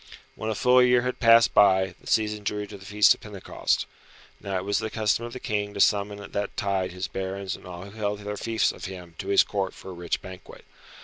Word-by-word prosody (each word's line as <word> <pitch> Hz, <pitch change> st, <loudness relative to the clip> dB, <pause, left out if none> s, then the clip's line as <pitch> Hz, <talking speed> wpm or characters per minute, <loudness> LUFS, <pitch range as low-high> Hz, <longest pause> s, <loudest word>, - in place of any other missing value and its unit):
When 110 Hz, -, -5 dB
a 110 Hz, -, -1 dB
full 125 Hz, +3 st, +5 dB
year 125 Hz, 0 st, +4 dB
had 125 Hz, 0 st, -3 dB
passed 115 Hz, -1 st, +6 dB
by, 95 Hz, -2 st, +4 dB
the -, -, -16 dB
season 105 Hz, -1 st, 0 dB
drew 105 Hz, +1 st, -2 dB
to 100 Hz, -, -11 dB
the 95 Hz, -1 st, -12 dB
Feast 105 Hz, 0 st, +5 dB
of -, -, -15 dB
Pentecost. 105 Hz, -3 st, -2 dB, 0.5 s
Now 100 Hz, -1 st, -3 dB
it 90 Hz, -, -4 dB
was 100 Hz, 0 st, +1 dB
the 110 Hz, -, -3 dB
custom 110 Hz, +1 st, 0 dB
of 120 Hz, -, -8 dB
the 130 Hz, -, -6 dB
King 105 Hz, -2 st, -3 dB
to -, -, -5 dB
summon 100 Hz, 0 st, +2 dB
at 100 Hz, -, -11 dB
that 100 Hz, 0 st, -3 dB
tide 95 Hz, -3 st, -1 dB
his 90 Hz, +1 st, -4 dB
barons 95 Hz, 0 st, -4 dB
and -, -, -13 dB
all 90 Hz, 0 st, -8 dB
who 100 Hz, -, -11 dB
held 105 Hz, -1 st, -2 dB
their 105 Hz, 0 st, -4 dB
fiefs 115 Hz, +1 st, 0 dB
of -, -, -9 dB
him 90 Hz, -3 st, -8 dB
to 95 Hz, -, -5 dB
his 100 Hz, 0 st, +5 dB
Court 100 Hz, -2 st, -3 dB
for 95 Hz, -, -10 dB
a -, -, -8 dB
rich 85 Hz, -1 st, -3 dB
banquet. 95 Hz, -1 st, -12 dB
100 Hz, 245 wpm, -26 LUFS, 95-110 Hz, 0.5 s, passed